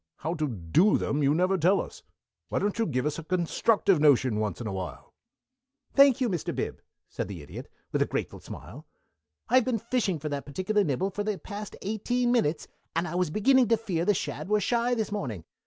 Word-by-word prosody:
How 160 - -3
to 155 -3 -1
do 115 - +2
them 145 - -1
you 140 +1 +3
never 185 +2 +2
tell 185 +5 +4
us. - - -6 0.5
Why - - -1
don't 205 +2 -1
you 225 - +2
give 130 +1 -1
us 150 +1 -1
a - - -7
constructive 185 +2 +2
notion 130 -7 +4
once 105 -4 -2
in 120 - -5
awhile?" 95 -3 -6 0.8
"Thank 275 -2 +6
you, 255 - +2
Mr. 175 -8 -2
Bib," - - -3 0.3
said - - -4
the 90 -6 -7
Idiot, - - -9 0.2
with - - 0
a - - +3
grateful - - -3
smile. - - -10 0.6
"I've 255 +1 +4
been 250 -3 +1
fishing 225 -5 -1
for 155 +1 -5
that 145 -1 -4
particular 190 +8 0
nibble 180 +5 -1
for 205 +2 -3
the 210 -1 -1
past 205 0 -7
eighteen 240 +4 0
minutes, 170 -11 +1 0.3
and 170 +1 0
I 155 - -5
was 180 -2 +1
beginning 250 - +4
to 230 +1 +3
fear 185 -7 -2
the 205 +3 +3
shad 185 - -4
were 210 0 +3
shy 240 +4 +1
this 220 -2 -2
morning. 120 - -4
185 Hz, 205 wpm, -28 LUFS, 150-220 Hz, 0.8 s, Thank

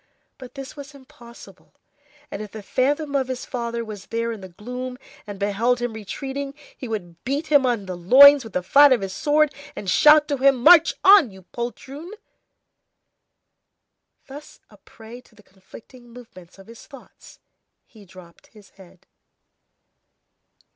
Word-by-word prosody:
But 255 0 -13
this 270 +1 -10
was 285 0 -12
impossible, 260 -4 -17 0.6
and 200 - -6
if 210 - -8
the 215 -1 -9
phantom 285 +6 -2
of 265 -2 0
his 255 -1 -6
father 235 -2 -5
was 210 -3 -10
there 230 0 -3
in 220 -3 -8
the 190 - -11
gloom, 250 +7 -8 0.3
and 205 -1 -8
beheld 210 +5 -1
him 240 -1 -4
retreating, 275 +6 -7 0.2
he 255 - -9
would 175 -7 -7
beat 285 +5 -4
him 280 -3 +4
on 230 -5 -2
the 185 -1 -6
loins 270 +10 +6
with 225 - -12
the 180 - -2
flat 285 +9 +5
of 240 - -1
his 195 -1 -6
sword, 300 +3 +1 0.2
and 200 - -8
shout 300 +4 +5
to 285 - -1
him: 265 -2 +2
"March 330 0 +6
on, 385 - +6
you 190 -1 -16
poltroon!" 265 - -8 2.1
Thus 285 +2 -13
a - - -18
prey 230 +2 -15
to 240 - -27
the 210 - -21
conflicting 230 +6 -17
movements 225 -8 -16
of 195 - -16
his 230 +2 -15
thoughts, 275 -4 -17 0.5
he 220 -5 -19
dropped 185 -3 -18
his 210 -3 -20
head. 185 -2 -20
240 Hz, 160 wpm, -21 LUFS, 205-275 Hz, 2.1 s, loins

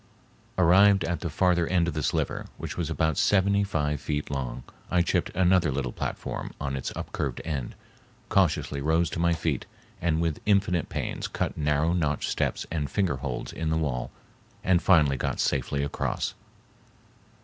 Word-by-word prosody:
Arrived 95 +2 +6
at 85 +1 -1
the 85 - -3
farther 85 +1 +2
end 90 -2 +2
of 85 - -1
the 75 - -2
sliver, - - -1
which - - -5
was 85 -3 -2
about 80 -2 +1
seventy 100 0 +3
five 75 -7 -1
feet 75 0 -3
long, 65 -3 -3 0.3
I 90 -1 +3
chipped 85 0 0
another 90 -2 +4
little 65 -3 -2
platform - - -4
on 70 -2 -2
its 65 - -3
upcurved 65 -4 -3
end, 70 -6 -3 0.5
cautiously 80 -6 +1
rose 80 +2 +2
to - - -3
my 85 0 +3
feet, 80 -4 -2 0.3
and 80 -2 +1
with 80 -2 -1
infinite 100 -4 +2
pains - - -3
cut - - -2
narrow 75 +2 +1
notch 75 -5 0
steps - - -1
and 75 -3 -1
finger 95 -9 0
holds - - -4
in 80 -1 -2
the 80 - +1
wall 70 -6 -1 0.5
and 90 -1 +3
finally 75 -7 +4
got - - -2
safely 70 0 0
across. 70 - -2
80 Hz, 165 wpm, -27 LUFS, 75-90 Hz, 0.5 s, Arrived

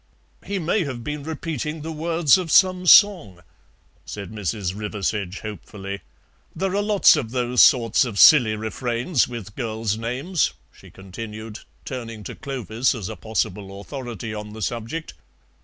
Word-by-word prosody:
"He 200 +2 -3
may 180 +3 0
have 130 -6 -5
been 150 +3 -4
repeating 155 0 -4
the 160 - -5
words 160 -1 +3
of 180 -3 -2
some 185 +1 +4
song," 170 - +6 0.6
said 100 +1 -8
Mrs. 100 -3 -3
Riversedge 105 -2 -3
hopefully; 100 -2 -7 0.5
"there 190 +3 -1
are 205 - +2
lots 205 -1 +5
of 115 - -3
those 125 0 +2
sorts 115 -4 +5
of 115 -5 -5
silly 120 -3 +7
refrains 120 +5 -1
with 115 -4 -8
girls' 110 -3 -2
names," 135 +9 -1 0.2
she - - -16
continued, 105 +3 -8 0.3
turning 115 -5 -6
to - - -7
Clovis 125 -2 -2
as 105 -6 -5
a - - -6
possible 100 -2 -3
authority 120 -2 -6
on 105 0 -7
the 110 -1 -6
subject. 120 - -4
115 Hz, 145 wpm, -23 LUFS, 105-150 Hz, 0.6 s, silly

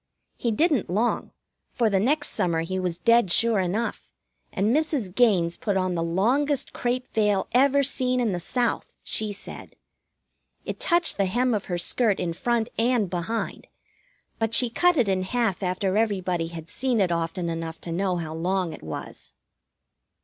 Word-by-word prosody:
He 235 - -2
didn't 285 - +1
long, 215 +7 0 0.4
for 235 - 0
the 200 -3 +2
next 290 +8 +1
summer 170 -6 0
he 185 +3 -3
was 180 -2 -2
dead 230 +1 +3
sure 230 +1 +3
enough, 190 +6 -2 0.4
and 210 +6 +1
Mrs. 295 - -1
Gaines 185 -8 +3
put 200 -3 -1
on 185 -1 0
the 170 - -1
longest 250 - +1
crêpe 250 +1 -1
veil 210 -3 +1
ever 280 +2 +4
seen 255 -2 +1
in 235 -4 +1
the 180 - -2
South, 240 +7 -1
she 215 -1 -1
said. 200 - -8 0.9
It - - -5
touched 345 -8 +3
the 195 -1 +1
hem 245 +5 +1
of 210 - -2
her 175 - -2
skirt 210 +3 +1
in 170 -1 -2
front 235 +4 -1
and 230 -5 +1
behind; 185 +6 -3 0.7
but 225 0 0
she 245 -2 +5
cut 355 +7 +3
it 240 -5 +3
in 190 -1 +1
half 210 0 -1
after 185 +1 -1
everybody 185 -6 0
had 165 -1 -9
seen 250 +4 -1
it 185 -3 +2
often 170 +1 -2
enough 165 -1 -4
to 170 - -6
know 180 +1 0
how 160 -2 -4
long 180 +1 -1
it - - -10
was. 80 -1 -8
205 Hz, 170 wpm, -25 LUFS, 180-245 Hz, 0.9 s, she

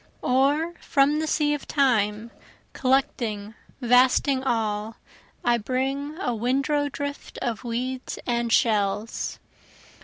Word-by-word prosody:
Or 285 +6 +2
from 290 +1 +2
the 315 - -1
sea 300 -1 +2
of 295 - -5
Time, 230 -5 +1 0.4
collecting 230 -5 0 0.3
vasting 255 +2 +4
all, 220 -3 -1 0.5
I 240 -1 +3
bring, 270 +6 -2
A 250 -10 -1
windrow 275 +5 0
drift 285 +1 -6
of 235 -1 -3
weeds 250 +2 -3
and 235 -1 0
shells. 210 -1 +1
255 Hz, 110 wpm, -25 LUFS, 230-280 Hz, 0.5 s, vasting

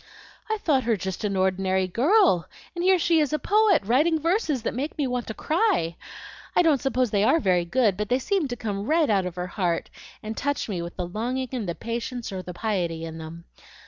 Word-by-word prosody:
"I 435 - 0
thought 280 - +1
her 230 -2 +2
just 190 +1 -5
an 200 -1 -1
ordinary 190 0 +1
girl, 270 - +3 0.3
and 345 -1 -3
here 375 0 +5
she 335 -1 +3
is 300 -1 +1
a - - +3
poet, 415 - +3
writing 300 +9 +3
verses 320 - 0
that - - -2
make 275 +5 -4
me 290 - 0
want 250 -2 -2
to 220 - -5
cry! 310 - +1 0.6
I - - +5
don't 305 -5 +3
suppose 255 -4 0
they 200 -1 +2
ARE 325 - +4
very 180 - +2
good, 210 0 +2
but 210 0 -3
they 250 - +3
seem 350 +4 0
to 245 - -4
come 210 -2 -4
right 315 -4 +3
out 195 -3 +2
of 175 - -7
her 180 0 -3
heart, 175 -2 -2 0.3
and 215 +1 -5
touch 285 +4 -2
me 190 -6 -3
with 170 0 -7
the 180 - -3
longing 245 +8 -3
and 235 -8 -3
the 170 - -3
patience 235 0 -4
or 190 -1 -4
the 180 - -8
piety 175 -4 -2
in 160 0 -7
them. 160 +1 -9
230 Hz, 225 wpm, -25 LUFS, 185-300 Hz, 0.6 s, here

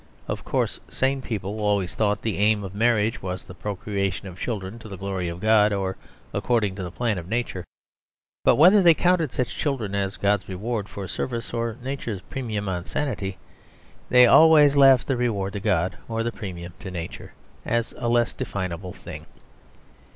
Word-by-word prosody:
Of - - -4
course - - -1
sane 135 +1 0
people 105 -3 -4
always 100 -3 0
thought 105 -2 0
the 110 -3 -2
aim 105 0 +3
of 95 -1 -7
marriage 110 0 +1
was 90 -1 -4
the - - -11
procreation 100 0 -3
of 90 -1 -10
children 110 -1 -4
to 110 - -11
the 95 - -7
glory 95 -2 -3
of 85 +1 -6
God 110 0 +4
or 95 -2 -1 0.4
according 110 -5 +1
to 95 - -4
the 90 - -4
plan 110 +1 -1
of 85 - -9
Nature; 115 -5 -2 0.8
but - - +5
whether 185 +7 +7
they 170 -3 +7
counted 175 -5 +2
such 125 - -2
children 125 -9 -2
as 100 -1 -1
God's 100 -1 +1
reward 105 +2 -3
for 100 -2 -6
service 115 +6 -4
or 115 -1 -2
Nature's 125 -7 -4
premium 110 -6 -3
on 90 -2 -2
sanity, 100 -10 -3 0.7
they 125 0 +8
always 150 +1 +7
left 135 -3 +6
the 135 - 0
reward 105 -6 -1
to 100 - -3
God 95 -3 0
or 115 0 -1
the 120 - -1
premium 90 -6 -7
to 95 - -7
Nature, 85 -2 -7 0.3
as 115 0 -1
a 120 -1 -1
less 120 0 +2
definable 95 -7 -4
thing. 75 0 -10
105 Hz, 180 wpm, -24 LUFS, 95-120 Hz, 0.8 s, they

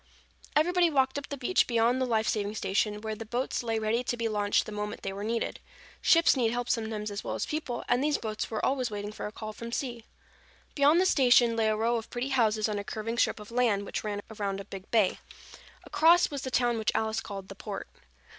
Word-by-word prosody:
Everybody 350 +3 +4
walked 270 -2 +1
up 285 - -11
the 285 - -4
beach 280 +8 +2
beyond 235 +2 +2
the 260 - +1
life 220 -2 +1
saving 210 0 -1
station 210 +1 0
where 220 0 -3
the 215 - -6
boats 240 +4 -2
lay 225 -2 -1
ready 220 +3 0
to 240 - -1
be 230 -1 -1
launched 205 -2 +1
the - - -7
moment 210 0 -5
they 195 - -3
were 200 +1 -6
needed. 230 +2 -2 0.4
Ships 330 -2 +5
need 240 -4 +2
help 245 +1 -2
sometimes 220 -3 -2
as 200 - -5
well - - -3
as - - -2
people, 300 -6 -3
and 245 +2 +2
these 300 0 +2
boats 215 -1 -4
were 220 -2 -2
always 260 -2 0
waiting 205 0 -5
for 215 - -5
a - - -7
call 215 0 -7
from 235 +2 -8
sea. 240 -3 -4 0.7
Beyond 290 +4 +4
the 370 - +3
station 245 -7 +5
lay 225 -1 +2
a 215 - +2
row 230 +2 +1
of 225 - -6
pretty 245 +3 -3
houses 220 -5 +2
on 210 -1 -2
a - - -4
curving 225 +3 -4
strip - - +2
of 210 +1 -11
land 230 -5 +1
which - - -4
ran 205 -1 -3
around 200 -2 -2
a 200 - -7
big 195 +1 -9
bay. 215 -5 +2 0.6
Across, 340 +2 +4
was 285 -2 -4
the 260 - -4
town 240 -2 +1
which 220 - +1
Alice 220 0 0
called 195 -3 -7
the - - -8
Port. - - -6
225 Hz, 235 wpm, -29 LUFS, 210-250 Hz, 0.7 s, Ships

